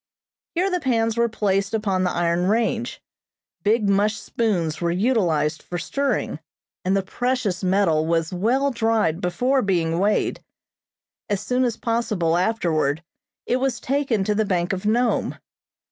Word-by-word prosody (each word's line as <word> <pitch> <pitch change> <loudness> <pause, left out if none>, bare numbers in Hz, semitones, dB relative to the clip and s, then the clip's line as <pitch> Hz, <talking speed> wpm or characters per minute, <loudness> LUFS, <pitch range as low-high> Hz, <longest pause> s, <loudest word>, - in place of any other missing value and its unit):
Here 375 +3 +1
the 360 - +1
pans 230 -6 +1
were 235 0 +2
placed 200 -1 0
upon 195 -4 0
the 180 - +2
iron 175 +1 0
range, 230 +3 0 0.6
big 215 0 +2
mush 205 +2 +2
spoons 175 -9 -1
were 170 - +1
utilized 175 -6 +1
for 175 - -5
stirring, 280 +10 -1 0.4
and 190 +2 +2
the 195 - 0
precious 240 -2 -1
metal 180 -5 +2
was 165 0 0
well 250 +10 +1
dried 225 -8 +1
before 250 +10 +1
being 170 -5 0
weighed. 205 +2 +1 0.9
As 205 -2 0
soon 250 +5 0
as 235 -3 0
possible 215 -8 0
afterward 170 -6 0 0.4
it 250 - +1
was 265 0 -1
taken 265 -6 0
to 210 - +1
the 220 +1 +1
Bank 180 -2 0
of 190 +2 -3
Nome. 235 +2 +1
205 Hz, 145 wpm, -23 LUFS, 175-235 Hz, 0.9 s, were